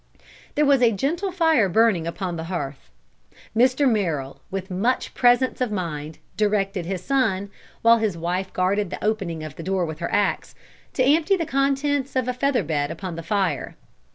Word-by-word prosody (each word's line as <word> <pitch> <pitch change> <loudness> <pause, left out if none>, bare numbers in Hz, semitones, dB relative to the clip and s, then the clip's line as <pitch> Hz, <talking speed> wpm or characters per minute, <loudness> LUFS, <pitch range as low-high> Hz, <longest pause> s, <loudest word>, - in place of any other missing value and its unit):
There 300 - +3
was 280 -2 +4
a 235 -2 +5
gentle 330 - -1
fire 320 - +3
burning 190 -4 +3
upon 175 +1 -3
the 160 -1 -5
hearth. 140 - -5 0.7
Mr. 255 +4 +4
Merrill, 165 - -1
with 190 0 -5
much 225 +8 0
presence 245 +1 +3
of 250 -4 0
mind, 160 -6 -4 0.2
directed 200 -4 0
his 185 -1 -3
son, 205 -7 0 0.3
while 230 0 +6
his 210 -6 -1
wife 180 +3 -2
guarded 190 +2 0
the - - -6
opening 190 -7 -1
of 155 -2 -8
the - - -6
door 185 +1 0
with 155 -1 -6
her - - -3
ax, - - 0 0.4
to 255 - +2
empty 320 +8 +3
the 335 - -2
contents 275 -1 0
of 255 -2 +1
a 250 - 0
feather 255 -3 +1
bed 145 -2 -1
upon 170 +1 -6
the 165 - -5
fire. 190 +2 -1
205 Hz, 180 wpm, -23 LUFS, 175-255 Hz, 0.7 s, while